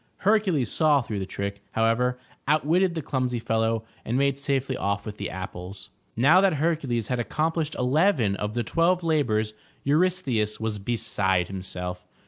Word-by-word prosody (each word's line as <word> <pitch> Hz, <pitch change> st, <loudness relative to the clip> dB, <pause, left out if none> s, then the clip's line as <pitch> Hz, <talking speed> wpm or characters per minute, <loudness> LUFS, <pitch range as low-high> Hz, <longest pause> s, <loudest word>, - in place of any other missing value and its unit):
Hercules 190 Hz, -, +2 dB
saw 150 Hz, -4 st, +3 dB
through 105 Hz, -3 st, -4 dB
the 95 Hz, -, -4 dB
trick, 100 Hz, 0 st, -4 dB
however, 115 Hz, +3 st, +2 dB, 0.3 s
outwitted 165 Hz, +5 st, +2 dB
the 160 Hz, -, -3 dB
clumsy 125 Hz, -2 st, -1 dB
fellow, 115 Hz, 0 st, 0 dB, 0.2 s
and 120 Hz, -, -1 dB
made 140 Hz, 0 st, +1 dB
safely 135 Hz, -1 st, -1 dB
off 100 Hz, -3 st, -2 dB
with 105 Hz, -1 st, -6 dB
the -, -, -4 dB
apples. 95 Hz, +1 st, -8 dB, 0.2 s
Now 150 Hz, +11 st, +6 dB
that 195 Hz, -3 st, +4 dB
Hercules 140 Hz, -8 st, -1 dB
had 125 Hz, -1 st, 0 dB
accomplished 155 Hz, +5 st, -1 dB
eleven 130 Hz, -, +2 dB
of 105 Hz, +2 st, -4 dB
the 120 Hz, -, 0 dB
twelve 175 Hz, +5 st, +2 dB
labors, 110 Hz, -10 st, +1 dB, 0.3 s
Eurystheus 140 Hz, -9 st, +1 dB
was 110 Hz, -2 st, -2 dB
beside 95 Hz, -4 st, 0 dB
himself. 90 Hz, -1 st, -6 dB
125 Hz, 150 wpm, -26 LUFS, 105-155 Hz, 0.3 s, Now